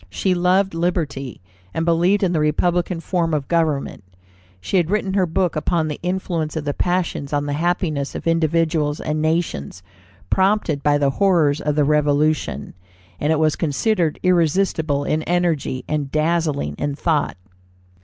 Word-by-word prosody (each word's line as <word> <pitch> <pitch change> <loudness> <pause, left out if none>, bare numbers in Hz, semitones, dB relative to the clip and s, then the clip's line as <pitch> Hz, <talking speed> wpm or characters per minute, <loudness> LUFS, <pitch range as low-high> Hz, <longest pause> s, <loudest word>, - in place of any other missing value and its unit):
She 185 - 0
loved 185 +2 +2
liberty, 155 - -2 0.3
and 160 - 0
believed 175 +4 +2
in 185 - +2
the 160 - +1
republican 170 +3 0
form 165 -3 0
of 140 -3 -3
government. 155 -9 0 0.6
She 140 - -1
had 170 -2 +1
written 200 -1 0
her 190 -2 +2
book 180 +1 0
upon 155 +1 0
the 150 - -5
Influence 175 -3 -2
of 155 -2 -3
the 145 - -1
Passions 175 -5 -1
on 145 0 0
the 145 - -2
Happiness 160 -3 -1
of - - -6
Individuals 165 -2 +1
and 155 0 -2
Nations, 155 - -2 0.5
prompted 190 -6 +2
by 145 0 +3
the 140 -1 +2
horrors 160 -5 +2
of 150 -1 -1
the 150 - +3
Revolution, 150 +1 +1 0.5
and 150 - +1
it 160 - +3
was 155 -1 +2
considered 165 +2 0
"irresistible 165 -4 +1
in 155 +2 0
energy 170 -7 0
and 150 -3 -2
dazzling 155 - 0
in 145 -1 -2
thought." 155 - 0
160 Hz, 155 wpm, -21 LUFS, 145-175 Hz, 0.6 s, by